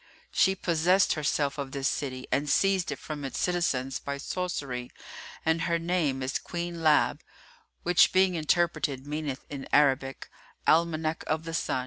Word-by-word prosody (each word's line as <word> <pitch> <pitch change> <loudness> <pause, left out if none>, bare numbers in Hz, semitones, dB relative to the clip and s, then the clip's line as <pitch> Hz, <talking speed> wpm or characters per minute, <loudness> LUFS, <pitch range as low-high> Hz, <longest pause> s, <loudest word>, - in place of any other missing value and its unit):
She 190 - +3
possessed 180 +2 +3
herself 145 -1 -1
of 135 -1 -5
this 140 -1 0
city 130 -3 -3
and 145 +2 0
seized 190 +1 +2
it 145 - -4
from 150 +1 -7
its 135 - -4
citizens 135 -7 0
by 140 0 -4
sorcery 140 -7 -4 0.6
and 160 +1 +2
her 170 +1 +1
name 165 -6 0
is 130 - -1
Queen 175 0 -5
Láb, 155 -2 +3 0.6
which 175 0 +5
being 185 0 +4
interpreted, 155 -4 0
meaneth 150 -2 -4
in 140 -2 -7
Arabic 135 -2 +2 0.4
'Almanac 160 -1 +2
of 155 +1 -1
the 165 0 -6
Sun. 160 - 0
155 Hz, 150 wpm, -28 LUFS, 140-170 Hz, 0.6 s, which